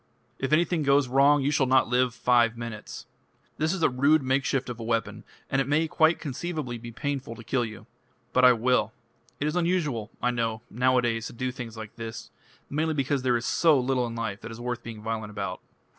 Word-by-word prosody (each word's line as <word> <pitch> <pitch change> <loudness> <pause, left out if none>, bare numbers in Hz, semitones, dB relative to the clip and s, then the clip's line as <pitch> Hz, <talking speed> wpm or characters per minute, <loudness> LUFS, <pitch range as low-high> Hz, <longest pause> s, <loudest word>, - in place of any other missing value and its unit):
If 130 - -2
anything 170 +1 +2
goes 140 -1 +3
wrong 140 +2 +4
you 140 - +1
shall 140 -2 +2
not 130 +1 +4
live 125 0 +1
five 120 -2 +3
minutes. 115 -2 -7 0.5
This 155 +1 +1
is 185 -3 -2
a - - +7
rude 140 +4 +3
makeshift 135 0 0
of 120 -1 -6
a - - -5
weapon, 115 0 -2 0.2
and 135 - +1
it 135 - -2
may 155 +3 +2
quite 160 +2 +3
conceivably 145 -4 -4
be 120 +1 -8
painful 135 -1 -4
to 115 - -11
kill 125 +2 0
you. 110 -3 -7 0.5
But 130 - +3
I 125 0 +9
will. 120 -1 +1 0.5
It 145 - -1
is 150 +2 -1
unusual, 165 - 0
I 125 - +1
know, 115 -2 -2
nowadays 120 -2 +1
to - - -10
do 130 +2 -2
things 120 -3 -8
like 110 0 -9
this 115 -1 -7 0.4
mainly 155 +2 -1
because 140 -1 0
there 125 -2 +2
is 120 - -5
so 160 -5 +4
little 125 -1 0
in 115 - -6
life 115 -3 -4
that 115 - -7
is 115 0 -9
worth 120 0 -3
being 110 -2 -9
violent 110 -1 -3
about." 100 -3 -5
125 Hz, 210 wpm, -27 LUFS, 115-140 Hz, 0.5 s, I